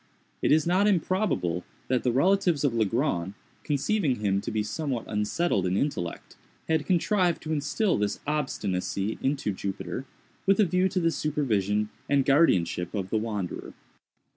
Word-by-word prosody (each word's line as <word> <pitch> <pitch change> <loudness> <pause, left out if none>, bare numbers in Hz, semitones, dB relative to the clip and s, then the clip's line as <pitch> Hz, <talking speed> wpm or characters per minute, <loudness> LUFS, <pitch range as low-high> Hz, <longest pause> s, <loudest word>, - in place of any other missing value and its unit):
It - - +2
is 155 0 +4
not 185 +4 +3
improbable 185 - +1 0.2
that 125 -1 +1
the 125 - +1
relatives 175 +3 +2
of 140 -5 +2
Legrand, 110 - 0 0.3
conceiving 150 - +1
him 100 -3 0
to - - -4
be 110 -1 -1
somewhat 130 +1 -3
unsettled 105 - 0
in 90 +2 0
intellect, 95 - -3 0.3
had 160 -2 0
contrived 180 -1 +2
to 160 - -2
instil 175 - 0
this 105 -1 -1
obstinacy 105 -9 -2
into 135 -5 0
Jupiter, 95 +4 -4 0.4
with 195 +1 +4
a 210 - +6
view 185 +2 +2
to 190 0 0
the 165 -1 +2
supervision 105 -10 0 0.2
and 140 -2 +3
guardianship 90 - +2
of 95 -2 -3
the 110 - +2
wanderer. 105 -5 -4
135 Hz, 150 wpm, -27 LUFS, 100-165 Hz, 0.4 s, a